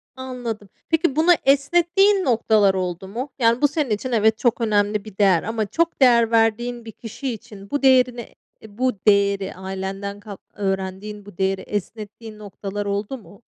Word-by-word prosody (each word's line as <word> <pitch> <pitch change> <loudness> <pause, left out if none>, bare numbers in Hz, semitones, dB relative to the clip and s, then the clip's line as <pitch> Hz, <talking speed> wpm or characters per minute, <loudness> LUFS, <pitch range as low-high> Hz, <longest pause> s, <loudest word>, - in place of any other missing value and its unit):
Anladım. 245 -6 -6 0.2
Peki, 325 -3 +1
bunu 320 +3 +4
esnettiğin 345 +8 +3
noktalar 220 -4 +3
oldu 185 0 -3
mu? 245 +8 -5
Yani, 230 +1 +3
bu 290 - +5
senin 290 -3 -2
için 215 +5 -2
evet, 220 -1 +3
çok 240 0 0
önemli 210 -1 +1
bir 210 -3 -12
değer 190 -5 +4
ama 225 -1 -2
çok 335 +8 -1
değer 235 -3 +5
verdiğin 230 +1 +1
bir 225 - -8
kişi 240 +4 -6
için 200 -2 -12
bu 285 - -1
değerini 250 -3 +2 0.3
eee, 210 -1 -15
bu 255 0 +1
değeri 200 -1 +2
ailenden 195 +2 -5
kap 205 -1 -10
öğrendiğin 195 +1 -4
bu 205 -4 -14
değeri 190 0 0
esnettiğin 215 +2 -7
noktalar 205 0 -6
oldu 205 +6 -3
mu? 205 -1 -17
220 Hz, 165 wpm, -22 LUFS, 200-250 Hz, 0.3 s, bu